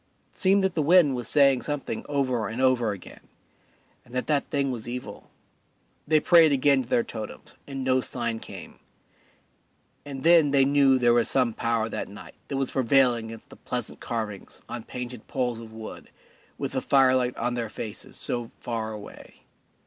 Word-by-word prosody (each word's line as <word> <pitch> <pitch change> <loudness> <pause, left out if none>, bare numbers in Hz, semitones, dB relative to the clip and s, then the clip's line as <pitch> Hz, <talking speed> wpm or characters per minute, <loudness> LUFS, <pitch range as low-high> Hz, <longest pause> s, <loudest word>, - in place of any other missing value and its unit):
It - - -23
seemed 195 +1 +4
that 190 -2 +1
the 160 - 0
wind 160 -2 +5
was 120 -2 -4
saying 140 -3 +4
something 145 -6 -4
over 130 -6 0
and 110 +3 -5
over 130 -4 +2
again, 100 -3 -10 0.8
and 120 - -14
that 125 - -1
that 150 -2 0
thing 140 -2 0
was 120 -2 -6
evil. 120 -4 -7 0.8
They 155 0 +4
prayed 165 -1 +6
again 140 0 +3
to 125 - -10
their 120 - +2
totems, 110 -1 -8
and 135 -2 -5
no 130 0 +2
sign 115 -2 -3
came. - - -10 1.2
And 135 -2 -7
then 165 -3 +6
they 140 -1 +4
knew 140 -1 +4
that 130 - +1
there 120 -1 +5
was 120 -1 +3
some 125 -4 +2
power 115 -1 0
that - - -5
night 100 - -11
that 140 - -3
was 135 -1 -1
prevailing 125 -2 +3
against 115 0 -11
the - - -13
pleasant - - -5
carvings 110 -4 -5
on 120 -2 -6
painted 125 -2 -7
poles 125 -3 -2
of 115 -1 -10
wood 110 0 -9 0.5
with - - -3
the - - -2
firelight 130 -2 +3
on 120 +1 -1
their 120 -2 -3
faces 105 0 -8
so 120 -2 -2
far 115 -2 -3
away. 105 -1 -12
125 Hz, 180 wpm, -26 LUFS, 115-140 Hz, 1.2 s, prayed